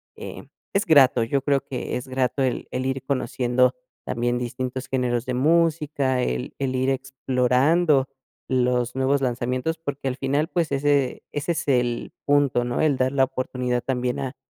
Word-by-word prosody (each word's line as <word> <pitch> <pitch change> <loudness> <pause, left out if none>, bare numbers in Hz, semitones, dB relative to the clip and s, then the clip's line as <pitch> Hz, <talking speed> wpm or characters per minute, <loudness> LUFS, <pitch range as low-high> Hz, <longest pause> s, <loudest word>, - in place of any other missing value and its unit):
eh, - - -8 0.3
es 200 +2 +1
grato. 135 -7 +5
Yo 135 +4 0
creo 140 -1 +1
que 125 -2 -4
es 125 - -7
grato 130 +1 0
el 130 -2 -1
el 130 +1 -2
ir 135 0 -2
conociendo 125 -1 +1 0.3
también 120 0 -1
distintos 125 +1 -4
géneros 125 -2 -1
de 125 - -2
música, 150 -3 +2
el 60 - -2
el 130 -1 -1
ir 130 +1 +1
explorando 135 +3 +2 0.4
los 125 -1 +1
nuevos 135 +1 +1
lanzamientos, 130 +5 -1
porque 145 -4 -4
al 125 - -1
final, 140 +4 0
pues, 165 -5 -1
ese 140 -1 +1
ese 145 +4 -2
es 155 - -4
el 120 -3 0
punto, 145 -4 +3
¿no? 120 0 -1
El 145 -4 +2
dar 130 +1 +1
la 135 -1 +3
oportunidad 125 -2 -2
también 125 -2 -1
a 130 -2 -4
130 Hz, 165 wpm, -24 LUFS, 125-140 Hz, 0.4 s, grato